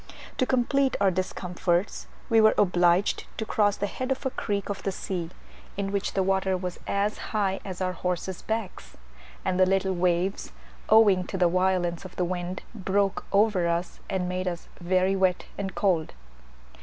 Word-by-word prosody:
To 255 - +2
complete 265 +2 +2
our 195 -1 +4
discomforts 180 0 -1 0.2
we 225 -1 +5
were 215 0 +5
obliged 180 0 +3
to 220 - -2
cross 205 -2 +2
the 205 - -1
head 255 +6 -4
of 265 +1 -2
a 265 - 0
creek 200 -5 -2
of 200 -1 -4
the 195 - -1
sea, 180 -3 -4 0.5
in 195 -1 -2
which 200 -1 -1
the 190 - +2
water 190 0 +1
was 180 -1 -5
as 200 +1 0 0.2
high 195 -2 +1
as 190 -1 -6
our 185 0 +1
horses' 180 0 -3
backs; 220 -3 -5 0.5
and 185 -1 0
the 185 - +7
little 190 0 +1
waves, 180 +2 0 0.4
owing 205 -4 +5
to 190 - -4
the 180 -1 +4
violence 180 -1 +1
of 185 - -10
the 180 - 0
wind, 180 +1 -4
broke 195 -1 0
over 200 -4 +3
us, 170 +1 -2
and 185 -1 -1
made 185 +1 -2
us 175 -1 -4
very 185 +2 +2
wet 185 -2 +1
and 195 -2 -4
cold. 175 -6 +1
190 Hz, 175 wpm, -27 LUFS, 180-200 Hz, 0.5 s, the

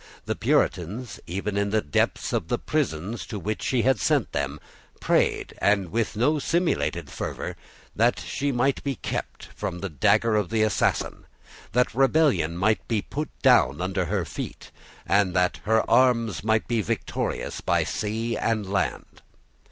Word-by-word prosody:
The - - 0
Puritans, 100 +7 0
even 100 +3 -3
in 100 0 +1
the 110 +1 +2
depths 75 -8 0
of - - -1
the - - 0
prisons 90 +10 -2
to 110 - -5
which 105 +3 -3
she 125 -3 +1
had 130 -4 +3
sent - - +1
them, - - -2 0.4
prayed, - - +1
and 100 -4 +2
with 115 +1 -1
no 145 +7 +2
simulated 165 - 0
fervour, - - -4 0.4
that - - +3
she 140 0 -2
might 135 +2 +1
be 140 -2 -1
kept - - -5
from 90 - -4
the 95 +2 -4
dagger 110 - +3
of 105 -4 +1
the 110 -1 +2
assassin, 110 -3 0 0.5
that 125 +2 +2
rebellion 135 - +3
might 105 +4 +1
be 110 -3 0
put 150 +2 -4
down 70 +4 +5
under 95 0 -1
her - - -1
feet, - - -7 0.3
and 95 0 +2
that 90 -3 +2
her 110 +1 +2
arms 115 -6 +3
might 110 0 +1
be 115 -2 +1
victorious 95 - -3
by - - +2
sea 115 +2 -2
and 110 -4 -1
land. 95 - -2
110 Hz, 160 wpm, -25 LUFS, 95-120 Hz, 0.5 s, down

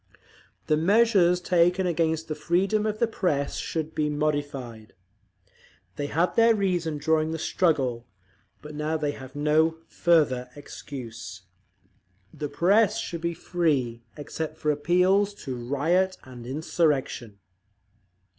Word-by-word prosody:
"The 155 - +2
measures 190 0 +4
taken 180 +1 +2
against 160 -2 0
the 155 - -2
freedom 190 +8 0
of 215 0 -2
the 235 - +2
press 165 -10 -1
should 160 -1 -3
be 150 -1 0
modified. 145 -7 -3 1.0
They 145 - -3
had 170 +4 0
their 230 0 +5
reason 175 -6 -1
during 155 +1 +1
the 160 - -3
struggle, 135 -9 0 0.6
but 150 0 -9
now 150 +2 -1
they 150 -2 -1
have 130 -1 -11
no 155 +2 +2
further 140 -7 +2
excuse. 125 -8 -9 0.9
The 150 -1 -5
press 195 +8 +3
should 170 -2 -5
be 170 0 -2
free, 145 -10 -1 0.2
except 155 +1 -5
for 150 - 0
appeals 180 +7 +2
to 130 -2 -3
riot 160 +10 0
and 125 -2 -11
insurrection." 135 - -1
155 Hz, 125 wpm, -26 LUFS, 145-175 Hz, 1.0 s, their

